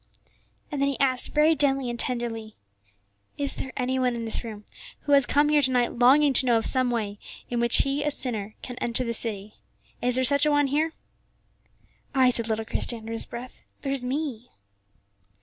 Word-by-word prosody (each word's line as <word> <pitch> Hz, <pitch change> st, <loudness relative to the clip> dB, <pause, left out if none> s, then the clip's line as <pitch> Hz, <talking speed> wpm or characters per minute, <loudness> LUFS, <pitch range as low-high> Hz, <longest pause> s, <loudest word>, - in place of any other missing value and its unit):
And 285 Hz, -2 st, -3 dB
then 280 Hz, -, +2 dB
he 275 Hz, -, -4 dB
asked 260 Hz, -2 st, +1 dB
very 305 Hz, +2 st, +4 dB
gently 275 Hz, -2 st, 0 dB
and 240 Hz, -1 st, -5 dB
tenderly, 230 Hz, -3 st, -3 dB, 0.8 s
"Is 280 Hz, -1 st, +1 dB
there 265 Hz, -, -6 dB
any 260 Hz, 0 st, -1 dB
one 250 Hz, -1 st, 0 dB
in 230 Hz, -1 st, -5 dB
this 225 Hz, -, +1 dB
room 215 Hz, -3 st, -9 dB, 0.4 s
who 290 Hz, -, -4 dB
has 275 Hz, -3 st, +4 dB
come 290 Hz, +1 st, +2 dB
here 300 Hz, -1 st, +3 dB
to 260 Hz, -, +4 dB
night 245 Hz, -2 st, 0 dB
longing 275 Hz, +3 st, +5 dB
to 260 Hz, -, +5 dB
know 235 Hz, -2 st, +3 dB
of 225 Hz, -, -2 dB
some 255 Hz, -1 st, +4 dB
way 210 Hz, -4 st, -3 dB, 0.3 s
in 240 Hz, -, -1 dB
which 235 Hz, 0 st, +3 dB
he, 275 Hz, +1 st, -2 dB
a 295 Hz, -, 0 dB
sinner, 220 Hz, -7 st, -1 dB
can 245 Hz, -, -7 dB
enter 240 Hz, +1 st, 0 dB
the 235 Hz, -1 st, -3 dB
city? 215 Hz, -2 st, -2 dB, 0.5 s
Is 245 Hz, 0 st, +1 dB
there 260 Hz, -, +2 dB
such 280 Hz, +3 st, +4 dB
an 300 Hz, -, +2 dB
one 290 Hz, 0 st, +3 dB
here?" 305 Hz, +4 st, -1 dB, 1.2 s
"Ay," 260 Hz, -1 st, +4 dB
said 230 Hz, -1 st, +1 dB
little 220 Hz, 0 st, -2 dB
Christie 235 Hz, +1 st, 0 dB
under 225 Hz, 0 st, -9 dB
his 225 Hz, -, +1 dB
breath; 245 Hz, +2 st, -10 dB, 0.2 s
"there's 275 Hz, -2 st, -2 dB
me." 250 Hz, -3 st, -4 dB
250 Hz, 200 wpm, -25 LUFS, 235-280 Hz, 1.2 s, longing